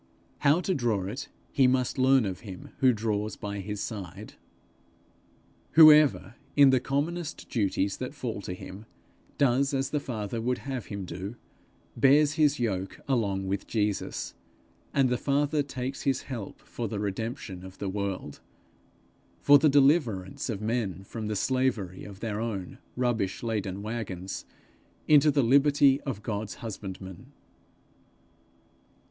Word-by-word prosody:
How 150 Hz, +4 st, +4 dB
to 190 Hz, -, 0 dB
draw 115 Hz, -, 0 dB
it, 130 Hz, +9 st, -5 dB, 0.2 s
he 135 Hz, -2 st, +4 dB
must 130 Hz, +1 st, +1 dB
learn 130 Hz, -2 st, +5 dB
of 95 Hz, -2 st, -4 dB
him 95 Hz, -4 st, -9 dB
who 130 Hz, -1 st, +5 dB
draws 105 Hz, -2 st, -2 dB
by 100 Hz, 0 st, -5 dB
his 105 Hz, +1 st, -5 dB
side. 100 Hz, -1 st, -7 dB, 1.4 s
Whoever, 155 Hz, -6 st, +7 dB, 0.2 s
in 140 Hz, -2 st, +7 dB
the 130 Hz, -, +4 dB
commonest 155 Hz, +5 st, -3 dB
duties 100 Hz, -3 st, 0 dB
that 130 Hz, +3 st, -5 dB
fall 115 Hz, -7 st, -4 dB
to 90 Hz, -1 st, -5 dB
him, 100 Hz, +4 st, -10 dB, 0.5 s
does 135 Hz, +1 st, +2 dB
as 135 Hz, 0 st, -1 dB
the 150 Hz, -, +1 dB
Father 115 Hz, -4 st, -4 dB
would 125 Hz, +2 st, 0 dB
have 130 Hz, -4 st, -5 dB
him 100 Hz, -2 st, -5 dB
do, 95 Hz, +6 st, -6 dB, 0.6 s
bears 145 Hz, +2 st, +5 dB
His 150 Hz, -3 st, +2 dB
yoke 95 Hz, -5 st, -2 dB
along 100 Hz, -8 st, 0 dB
with 95 Hz, +1 st, -3 dB
Jesus; 105 Hz, -3 st, -2 dB, 0.6 s
and 135 Hz, -2 st, +3 dB
the 125 Hz, -1 st, 0 dB
Father 145 Hz, +2 st, +1 dB
takes 135 Hz, -1 st, -5 dB
his 135 Hz, -2 st, 0 dB
help 120 Hz, -7 st, -7 dB
for 120 Hz, -, -5 dB
the 105 Hz, 0 st, -4 dB
redemption 100 Hz, -2 st, -4 dB
of 95 Hz, 0 st, -11 dB
the 100 Hz, -, -4 dB
world 95 Hz, -6 st, -4 dB, 1.0 s
for 145 Hz, 0 st, +7 dB
the 155 Hz, -, +4 dB
deliverance 135 Hz, -, +2 dB
of 105 Hz, -3 st, -3 dB
men 105 Hz, -5 st, -2 dB
from 110 Hz, +2 st, -6 dB
the 105 Hz, -, -2 dB
slavery 115 Hz, -6 st, -1 dB
of 100 Hz, -1 st, -11 dB
their 110 Hz, -2 st, -3 dB
own 100 Hz, -6 st, -4 dB, 0.2 s
rubbish 120 Hz, -6 st, -1 dB
laden 100 Hz, -4 st, -2 dB
waggons, 100 Hz, -5 st, -5 dB, 0.6 s
into 150 Hz, 0 st, +6 dB
the 140 Hz, -2 st, +3 dB
liberty 140 Hz, +2 st, +4 dB
of 110 Hz, -6 st, -4 dB
God's 105 Hz, -1 st, -4 dB
husbandmen. 95 Hz, -1 st, -8 dB
115 Hz, 140 wpm, -28 LUFS, 100-135 Hz, 1.4 s, Whoever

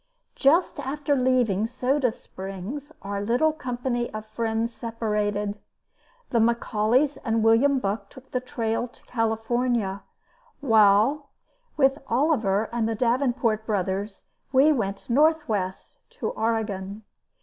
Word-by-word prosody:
Just 320 Hz, +6 st, +3 dB
after 285 Hz, +2 st, -1 dB
leaving 250 Hz, -6 st, +2 dB
Soda 255 Hz, +2 st, +1 dB
Springs 195 Hz, -, -8 dB
our 200 Hz, 0 st, -3 dB
little 245 Hz, +9 st, +2 dB
company 245 Hz, -4 st, -3 dB
of 215 Hz, 0 st, -5 dB
friends 225 Hz, +1 st, -2 dB
separated. 210 Hz, -3 st, -2 dB, 0.7 s
The 235 Hz, -, +3 dB
McAuleys 235 Hz, +4 st, +2 dB
and 225 Hz, -2 st, +1 dB
William 240 Hz, +5 st, +4 dB
Buck 210 Hz, -3 st, -3 dB
took 260 Hz, -1 st, -15 dB
the 250 Hz, -, 0 dB
trail 235 Hz, -2 st, -2 dB
to 235 Hz, -, -23 dB
California, 225 Hz, -2 st, -1 dB, 0.6 s
while 225 Hz, +3 st, +4 dB, 0.5 s
with 270 Hz, 0 st, +3 dB
Oliver 225 Hz, -6 st, +1 dB
and 230 Hz, -2 st, 0 dB
the 225 Hz, -, -1 dB
Davenport 235 Hz, -2 st, +1 dB
brothers 195 Hz, 0 st, -2 dB, 0.3 s
we 275 Hz, +3 st, +5 dB
went 200 Hz, -8 st, -2 dB
northwest 240 Hz, -, 0 dB, 0.2 s
to -, -, -1 dB
Oregon. 215 Hz, -2 st, -2 dB
230 Hz, 115 wpm, -25 LUFS, 210-260 Hz, 0.7 s, we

